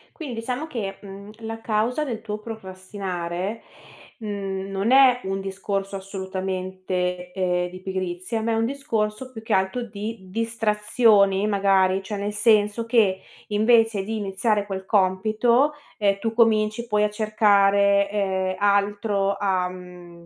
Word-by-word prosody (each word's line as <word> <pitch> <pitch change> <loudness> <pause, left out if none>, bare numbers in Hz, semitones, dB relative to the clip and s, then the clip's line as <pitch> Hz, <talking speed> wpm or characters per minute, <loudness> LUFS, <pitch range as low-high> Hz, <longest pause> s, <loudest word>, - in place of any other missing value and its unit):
Quin 295 -7 -6
diciamo 250 +6 -4
che, 205 -9 -5
mhmm, 200 0 -10
la 225 0 -6
causa 225 +6 0
del 235 -6 -4
tuo 215 -1 -5
procrastinare, 190 -2 -5 0.6
mhmm, 195 -3 -4
non 195 +4 0
è 260 -2 +6
un 195 0 -2
discorso 195 0 -3
assolutamente, 185 -2 -4
ehm, 180 -1 0
di 185 +1 -10
pigrizia, 185 +3 -3
ma 230 +1 -1
è - - +1
un 225 0 +1
discorso, 255 -3 -2
più 225 -3 -9
che 225 - -1
altro 190 +6 +1
di 215 0 -6
distrazioni, 210 -2 +2
magari, 195 -2 +2
cioè 205 +2 -5
nel 205 +1 -3
senso 210 +1 +3
che 220 -5 +3 0.3
invece 220 -1 +3
di 220 +3 -3
iniziare 205 +1 0
quel 190 -1 -5
compito, 215 +8 +2 0.2
ehm, 200 -2 +1
tu 225 +2 -2
cominci 225 0 +2
poi 210 -1 +2
a 210 - +2
cercare, 200 -2 +3
ehm, 190 -2 -1
altro, 200 0 +1
a, 185 -3 0
mhmm, 180 -2 -12
205 Hz, 140 wpm, -24 LUFS, 190-225 Hz, 0.6 s, è